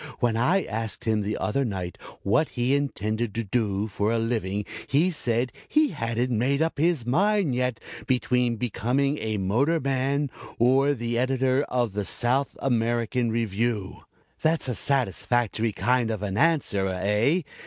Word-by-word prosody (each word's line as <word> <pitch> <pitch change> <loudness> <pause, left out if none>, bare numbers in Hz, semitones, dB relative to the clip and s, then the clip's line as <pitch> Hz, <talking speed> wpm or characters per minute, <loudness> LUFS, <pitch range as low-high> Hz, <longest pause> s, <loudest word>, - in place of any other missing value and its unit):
"When 120 -3 +1
I 160 +12 +2
asked 110 0 -4
him 110 -2 +1
the 105 +1 -2
other 135 +6 0
night 95 -7 -4 0.3
what 145 +10 +2
he 125 +2 0
intended 115 -6 -1
to 115 - -1
do 105 -2 0
for 105 0 -1
a 115 - +1
living 105 -3 -1 0.2
he 160 +7 +3
said 120 -5 -1 0.2
he 305 -1 +3
hadn't 115 - -2
made 130 +5 +1
up 160 -2 0
his 160 -6 +2
mind 190 - +2
yet 125 -1 -1 0.3
between 125 -2 +1
becoming 125 +5 0
a 110 -1 -2
motor 120 - +1
man 135 +1 0 0.3
or 135 +4 +3
the 120 -1 -2
Editor 130 +1 +2
of 120 -5 0
the 105 0 -2
South 125 +7 0
American 120 -1 +1
Review. 110 -2 -1 0.4
That's 160 -2 +1
a 125 - -1
satisfactory 120 -2 0
kind 120 +2 +1
of 110 -2 -3
an 100 -2 -2
answer, 140 -10 +2
eh? 105 - +1
120 Hz, 155 wpm, -26 LUFS, 110-135 Hz, 0.4 s, he